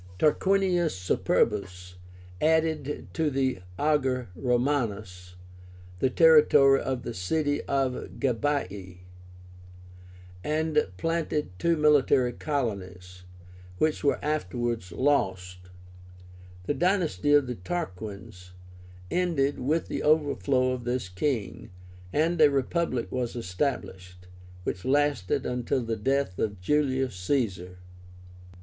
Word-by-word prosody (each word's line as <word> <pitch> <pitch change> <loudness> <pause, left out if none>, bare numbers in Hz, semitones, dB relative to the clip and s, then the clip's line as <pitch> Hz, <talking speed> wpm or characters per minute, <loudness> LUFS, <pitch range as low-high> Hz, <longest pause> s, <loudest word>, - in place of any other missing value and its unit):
Tarquinius 180 - +2
Superbus 90 0 -1 0.5
added 155 -2 0
to 160 -2 +1
the 130 -5 0 0.2
AGER 130 -6 0
ROMÁNUS 110 -8 -1 0.6
the 130 - +2
territory 150 -2 +6
of 130 -2 -3
the 120 - -5
city 145 - -1
of 135 -2 -1
GABII, 105 -8 -2 1.4
and 155 +1 +1
planted 165 - -1
two 170 -1 +2
military 140 -4 +3
colonies, 90 - -4 0.5
which 155 +5 0
were 140 - +2
afterwards 120 - -2
lost. 90 -9 -1 0.9
The 120 - -1
dynasty 170 - +1
of 145 -2 +5
the 125 - -4
Tarquins 100 - -6 0.6
ended 160 -6 0
with 155 +6 0
the - - -3
overthrow 145 -4 +2
of 125 -1 -4
this 120 -5 -2
king, 100 +1 -3 0.4
and 160 +2 +1
a 150 - +8
Republic 140 -1 -1
was 125 -2 -3
established, 90 -4 -4 0.4
which 90 0 -4
lasted 140 -7 +1
until 125 +1 -1
the 115 0 -2
death 135 -3 -1
of 100 -3 -2
Julius 130 +1 0
Caesar. 90 -4 -2
130 Hz, 100 wpm, -27 LUFS, 100-150 Hz, 1.4 s, a